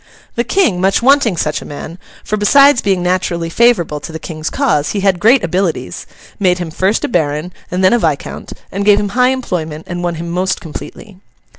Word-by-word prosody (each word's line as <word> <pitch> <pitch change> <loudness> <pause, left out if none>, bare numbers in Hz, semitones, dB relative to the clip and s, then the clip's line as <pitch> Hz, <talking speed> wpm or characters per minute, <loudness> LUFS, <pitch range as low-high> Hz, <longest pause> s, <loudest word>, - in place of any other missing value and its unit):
The 235 - 0
King, 240 - +1
much 195 +4 +2
wanting 260 -8 +3
such 150 -1 -1
a - - -10
man—for, 165 +7 -7
besides 275 +6 +5
being 190 -3 0
naturally 175 -2 -1
favourable 195 -9 +2
to 165 - -8
the 160 - -5
King's 160 -1 -5
cause, 155 - 0
he 200 - -2
had 190 -2 +2
great 230 +4 +4
abilities—made 180 - -2
him 175 -3 -5
first 190 +6 0
a - - -1
Baron, 160 -2 -1 0.2
and 180 +1 -2
then 185 - +5
a 240 - +3
Viscount, 155 -7 -3 0.2
and 200 +1 -2
gave 205 0 +5
him 205 - -2
high 250 +4 +3
employment, 165 -12 -3
and 175 0 -5
won 175 -1 -1
him 170 +1 -6
most 185 +1 -1
completely. 185 +5 -10
185 Hz, 190 wpm, -15 LUFS, 165-215 Hz, 0.2 s, besides